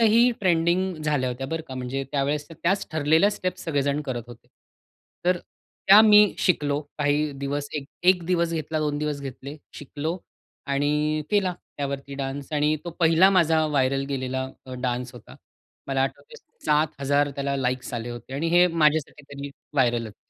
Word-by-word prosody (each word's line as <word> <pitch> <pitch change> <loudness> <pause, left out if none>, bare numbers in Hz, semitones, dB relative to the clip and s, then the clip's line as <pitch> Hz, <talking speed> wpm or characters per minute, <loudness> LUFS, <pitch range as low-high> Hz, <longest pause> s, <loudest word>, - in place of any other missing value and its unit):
ही 230 +2 +5
trending 180 +1 +2
झाल्या 145 -4 0
होत्या 135 +2 -5
बरं 160 +2 -3
का? 130 - -6
म्हणजे 130 +2 -3
त्यावेळेस 145 +2 -1
त्याच 175 +5 -1
ठरलेल्या 160 +6 +3
स्टेप्स 185 -3 -4
सगळेजण 145 -2 0
करत 130 -5 -4
होते. 120 -1 -13 0.8
तर 180 0 +2 0.5
त्या 200 +2 +10
मी 210 -2 +6
शिकलो 145 -5 +1 0.2
काही 145 +1 +1
दिवस 140 +1 -4 0.4
1 180 -1 +5
दिवस 170 -2 +1
घेतला, 160 -1 -2
2 150 -1 -1
दिवस 150 -1 -2
घेतले. 140 +1 -8 0.2
शिकलो 150 +4 -4 0.5
आणि 150 +2 0
केला 200 -3 +2 0.2
त्यावरती 140 0 -4
डान्स 140 +1 -5
आणि 150 0 +2
तो 170 - -4
पहिला 165 +3 +5
माझा 165 -4 +3
व्हायरल 135 -2 +1
गेलेला 130 -1 -2 0.2
अ, 130 - -7
डान्स 125 0 -2
होता. 120 - -13 0.5
मला 135 -1 0
आठवत 460 - -5 0.3
7,000 145 -1 +1
त्याला 140 0 -2
लाइक्स 130 -1 -2
आले 120 +1 -4
होते 120 +2 -9
आणि 155 +4 -1
हे 175 0 +7
माझ्यासाठी 150 -2 +1
तरी 140 0 -6 0.2
व्हायरल 120 -4 +2
होत. 105 - -12
145 Hz, 155 wpm, -25 LUFS, 135-165 Hz, 0.8 s, त्या